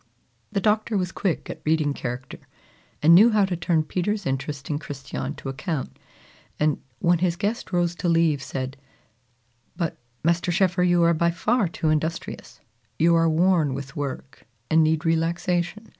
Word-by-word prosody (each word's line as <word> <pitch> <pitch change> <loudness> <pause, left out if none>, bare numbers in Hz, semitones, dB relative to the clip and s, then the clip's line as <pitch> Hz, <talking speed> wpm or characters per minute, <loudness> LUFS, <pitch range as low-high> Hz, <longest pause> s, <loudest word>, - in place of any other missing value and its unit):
The 200 - 0
Doctor 215 +1 +1
was 180 -2 -1
quick 180 -2 -2
at - - -7
reading 155 -2 +1
character, 125 0 -6 0.6
and 165 +2 +7
knew 210 +7 +8
how 215 -3 +3
to 190 -2 -2
turn 165 -2 +1
Peter's 190 +6 -2
interest 135 +1 -3
in 145 -1 -2
Christiane 140 -1 -6
to 140 - -9
account, 135 +2 -4 0.6
and, 150 -1 +1 0.2
when 175 -1 +2
his 175 -1 +1
guest 205 +5 -3
rose 175 -1 +1
to 175 - -1
leave, 165 -4 +3
said, 135 0 -5 1.0
"But, 170 -3 -3 0.2
Master 170 +2 +1
Schoeffer, 185 +1 +2
you 175 -1 +4
are 170 0 +4
by 170 +1 +2
far 210 +5 +1
too 160 -1 -2
industrious. 155 +2 -3 0.4
You 170 +1 +4
are 165 0 +4
worn 160 -4 +2
with 135 +2 -7
work, 140 -4 -6 0.2
and 160 0 +5
need 155 +1 +1
relaxation. 170 +5 0
165 Hz, 160 wpm, -24 LUFS, 150-180 Hz, 1.0 s, knew